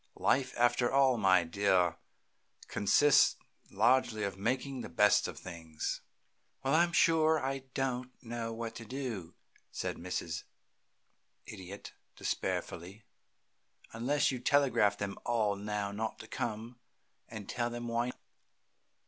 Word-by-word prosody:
Life, 130 -1 +1
after 120 0 +3
all, 135 -3 +4
my 95 -3 +5
dear, 90 -1 +2 0.7
consists 120 +8 +4 0.3
largely 115 +1 +2
of 100 -2 -2
making 130 +6 -2
the - - -7
best 105 -1 +4
of - - -7
things." 80 -3 -5 0.6
"Well, 135 - +1
I'm 170 +2 +4
sure 160 -2 +4
I 135 0 -3
don't 130 -1 -1
know 115 -1 -5
what 115 0 -5
to 115 - -8
do," 115 -8 -5 0.4
said - - -3
Mrs. 85 -2 -4 1.0
Idiot, 95 0 -9 0.2
despairfully, 95 +6 -3 0.9
"unless 135 +7 +1
you 130 - -3
telegraph 125 -7 +3
them 100 -1 -4
all 110 -4 +1
not 105 +1 -3
to 110 - -11
come, 115 +2 -4 0.5
and 110 -3 -8
tell 120 -1 -1
them 120 0 -5
why." 120 +1 0
115 Hz, 120 wpm, -32 LUFS, 100-130 Hz, 1.0 s, my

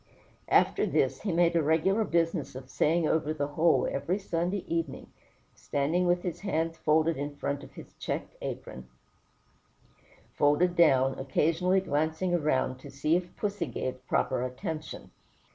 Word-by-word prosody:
After - - +3
this, - - +1
he 200 - -2
made 170 0 +3
a 165 - +4
regular 160 +8 +2
business 165 -7 0
of 130 0 -9
saying 165 +3 +2
over 155 0 0
the 145 -1 -2
whole 160 +3 +3
every 140 +7 -1
Sunday 180 0 -2
evening, 165 -4 -3 0.4
standing 160 +6 0
with 175 0 +2
his 175 -3 -4
hands 165 -4 -1
folded 160 0 +2
in 145 +1 -4
front 140 0 -3
and 135 - -12
his - - -12
checked - - -4
apron 65 0 -6 1.5
folded 160 +5 +3
down, 135 -6 +4
occasionally 165 +7 +1
glancing 160 +2 0
round 130 -3 0
to 140 - -11
see 145 +4 +1
if 175 0 -3
pussy 205 -5 -2
gave 130 +1 -5
proper 130 - +1
attention. 135 +5 -5
160 Hz, 145 wpm, -29 LUFS, 140-175 Hz, 1.5 s, a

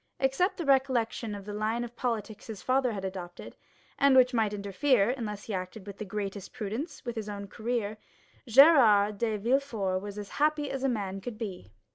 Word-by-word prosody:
Except 270 +9 +1
the 340 - -3
recollection 250 -5 +1
of 200 -1 -9
the 205 - -6
line 220 +3 -1
of 240 0 -8
politics 220 -3 -3
his 220 -4 -7
father 255 -1 +2
had 195 -2 -4
adopted, 180 -2 -7 0.4
and 275 -1 +5
which 255 0 +6
might 220 -3 +2
interfere, 205 +3 +2
unless 210 -5 -5
he 220 - -6
acted 185 +2 -5
with 200 -1 -9
the 215 - -4
greatest 200 -1 -5
prudence, 225 - -5
with 240 -1 -4
his 215 -2 -4
own 200 -1 -5
career, 220 -1 -3 0.5
Gérard 220 -7 +6
de 220 -2 0
Villefort 225 -5 0
was 205 0 -7
as 205 -1 -6
happy 300 -1 +2
as 270 -1 -4
a 270 - +2
man 195 -5 -3
could 230 +1 -6
be. 190 - -6
220 Hz, 190 wpm, -29 LUFS, 200-255 Hz, 0.5 s, which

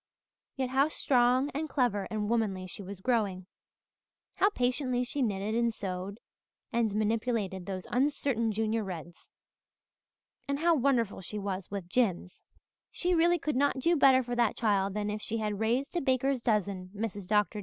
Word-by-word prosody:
Yet 260 -2 -2
how 270 +2 +4
strong 255 -1 +2
and 305 +3 -3
clever 240 -7 0
and 210 -1 -2
womanly 210 -5 0
she 185 - -6
was 195 0 -8
growing! 205 -6 0 0.9
How 400 - +4
patiently 250 -5 0
she 275 +3 -3
knitted 205 -2 -1
and 235 0 +2
sewed 195 0 -5 0.5
and 225 -3 +1
manipulated 215 -3 -1
those 185 -2 -4
uncertain 255 -3 +1
Junior 220 +1 0
Reds! 175 -3 -8 1.2
And 280 0 0
how 335 +3 +3
wonderful 250 -9 +1
she 210 +4 -6
was 195 -2 -4
with 195 -3 -5
Jims. 185 -4 -1 0.5
"She 360 0 0
really 345 +1 +4
could 300 -3 -2
not 280 +1 +2
do 335 +7 +2
better 265 -3 +5
for 245 0 -4
that 235 -3 +1
child 200 -3 +1
than 210 0 -1
if 210 0 -4
she 225 +2 -3
had 210 -2 -2
raised 240 +8 0
a 345 - +1
baker's 265 0 +1
dozen, 200 -5 0
Mrs. 205 -3 -4
Dr. 210 +1 +1
225 Hz, 165 wpm, -30 LUFS, 200-260 Hz, 1.2 s, better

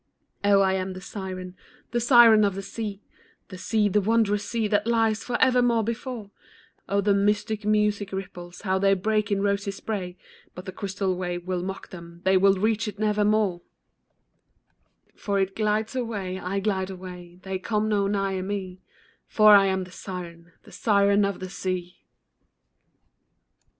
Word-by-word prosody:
Oh, 200 -1 +5
I 190 -1 +2
am 190 0 -2
the 185 - -8
siren, 185 -1 -7 0.4
the 240 - 0
siren 235 -3 +7
of 200 -2 +1
the 195 - -5
sea, 210 -1 -6 0.5
The 185 - -9
sea, 215 +2 +1
the 205 +1 +2
wondrous 210 -1 +1
sea, 230 -2 0
that 205 +1 0
lies 225 -2 +1
forevermore 245 -2 +2
before; 230 -1 -5 0.6
Oh, 200 0 +2
the 200 0 +2
mystic 210 +1 0
music 210 -1 +1
ripples, 180 -2 -7
how 190 -1 0
they 195 0 +3
break 210 +2 0
in 200 0 +1
rosy 200 0 0
spray, 195 -2 -5 0.4
But 180 - -9
the 190 - -5
crystal 195 -1 -2
wave 175 -1 -4
will 185 -1 -2
mock 190 +2 -6
them, 170 -1 -11
they 190 0 +3
will 195 +1 +5
reach 220 +3 0
it 210 -1 -6
nevermore, 210 -3 +1 1.5
For 200 -1 -2
it 195 0 -1
glides 215 +2 -1
away, 205 -7 -3
I 190 +2 -2
glide 190 -2 -1
away, 180 -2 -10
they 190 -1 -4
come 215 +2 -1
no 205 -2 +1
nigher 195 -2 -1
me, 190 -1 -5 0.5
For 215 -1 +6
I 200 -1 +7
am 190 -1 0
the 180 - -12
siren, 170 -2 -8
the - - -16
siren 200 -1 +3
of 200 -1 -1
the 185 - -6
sea. 185 -2 -4
200 Hz, 160 wpm, -25 LUFS, 185-215 Hz, 1.5 s, siren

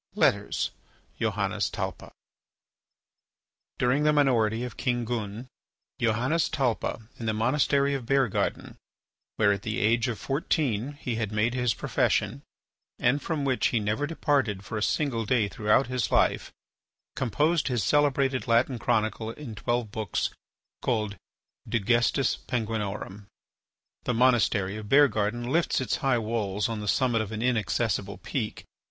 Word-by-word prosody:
LETTERS: - - +1 0.5
JOHANNES 105 -2 0
TALPA - - -5 1.7
During 125 +4 +2
the 150 0 +4
minority 120 -6 +2
of 125 -3 -6
King 120 -2 -1
Gun, 110 0 -4 0.5
Johannes 120 +8 +1
Talpa, 115 -4 -1
in 115 - -4
the 110 - 0
monastery 140 +4 +2
of 130 -4 -4
Beargarden, 135 -5 0 0.6
where 105 -2 +4
at 100 -1 -1
the 110 +1 -3
age 115 +4 +2
of 120 -3 -2
fourteen 135 - -1
he 125 -5 -4
had 110 -3 -2
made 110 +3 +1
his 125 -2 +1
profession - - 0 0.6
and 135 +4 +2
from 150 -1 -2
which 130 -2 +2
he 120 - +1
never 105 +8 -1
departed 135 -11 0
for 110 - -6
a 105 - -2
single 120 -1 0
day 110 -1 +2
throughout 105 +6 +2
his 125 -3 -2
life, - - +2 0.6
composed 150 +6 +1
his 120 -6 0
celebrated 135 -2 +2
Latin 120 +2 +2
chronicle 110 -2 0
in 120 0 -7
twelve 110 +1 -2
books 110 -4 -2 0.5
called 105 -4 -1 0.5
"De 115 - +1
Gestis 120 +6 +2
Penguinorum." 105 -4 -3 0.8
The 125 - 0
monastery 115 -5 +3
of 105 -1 -8
Beargarden 120 -4 +3
lifts 170 +3 +2
its 125 -6 -1
high 135 -2 +2
walls 105 -3 -1
on 115 -2 -3
the 105 - -5
summit 120 +1 +2
of 110 -1 -5
an 110 +1 -3
inaccessible 110 -3 0
peak. 115 -6 -4
115 Hz, 140 wpm, -27 LUFS, 105-130 Hz, 1.7 s, the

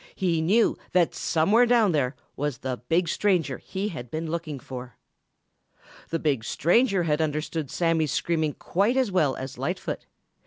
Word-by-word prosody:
He 170 -4 +1
knew 210 +8 +3
that 175 -2 +3
somewhere 205 +10 +3
down 230 -5 +4
there 140 -4 0 0.2
was 145 -2 -2
the 130 -1 -3
big 170 +1 +2
stranger 170 -8 +1
he 195 +2 -4
had 140 - -7
been 160 +3 -4
looking 165 -4 -3
for. 125 -2 -9 1.1
The 165 - 0
big 145 -8 0
stranger 195 - +2
had 155 -1 +1
understood 155 -1 -2
Sammy's 165 -3 +1
screaming 160 -3 0
quite 205 - 0
as 255 -6 +2
well 155 -8 +2
as 130 -1 -7
Lightfoot. 155 +8 -3
165 Hz, 155 wpm, -26 LUFS, 145-185 Hz, 1.1 s, down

